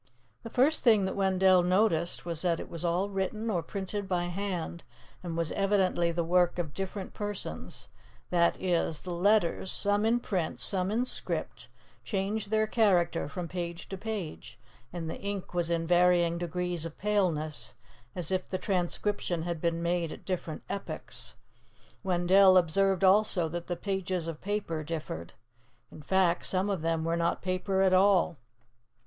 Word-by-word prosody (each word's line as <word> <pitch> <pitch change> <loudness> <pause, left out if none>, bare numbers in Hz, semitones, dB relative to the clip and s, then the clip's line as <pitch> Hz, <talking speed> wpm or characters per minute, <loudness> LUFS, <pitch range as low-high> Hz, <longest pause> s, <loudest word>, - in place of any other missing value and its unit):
The 230 - -8
first 270 +7 +3
thing 220 -5 +5
that 190 - -2
Wendell 190 -1 +4
noticed 175 -2 +1
was 165 -2 -1
that 170 -2 +1
it - - -8
was 170 -1 -6
all 180 +4 0
written 210 +4 -2
or 175 -4 0
printed 200 +2 -4
by 180 -2 0
hand 175 -2 -4 0.4
and 170 -2 -5
was 165 -2 -1
evidently 190 -4 +2
the 170 0 -1
work 175 +1 +2
of 165 -4 -3
different 195 0 -5
persons; 205 -1 -6 0.4
that 170 -1 +3
is, 170 -4 0
the 180 - -4
letters, 185 0 +2
some 205 0 +1
in 230 +2 +3
print, 185 -8 -2
some 185 -1 -1
in 230 +4 +1
script, - - -4 0.3
changed 200 0 -2
their 215 0 +2
character 185 -8 +2
from 170 +4 -5
page 170 -1 -5
to 195 - -4
page, 195 - -6 0.3
and 170 -2 -5
the 160 - -6
ink 200 -2 -4
was 175 -1 0
in 165 -1 0
varying 175 -1 +3
degrees 175 -1 -2
of 165 -2 -6
paleness, 175 -10 -1 0.4
as 175 -1 -3
if 185 -1 -1
the 185 - -1
transcription 180 -2 -1
had 170 -2 -3
been 170 0 0
made 170 -1 0
at - - -10
different 175 -4 -4
epochs. 200 0 -6 0.7
Wendell 185 +1 +5
observed 190 +2 +2
also 190 -3 +4
that 170 +1 -5
the 175 - -2
pages 185 -2 -2
of 165 -2 -6
paper 195 -6 -2
differed. 150 - -5 0.6
In - - -11
fact, 180 +2 +2
some 190 +2 0
of 190 -5 -2
them 165 0 0
were 165 +1 0
not 170 0 0
paper 190 +1 0
at 190 -1 +4
all. 185 -3 +4
180 Hz, 165 wpm, -29 LUFS, 170-195 Hz, 0.7 s, thing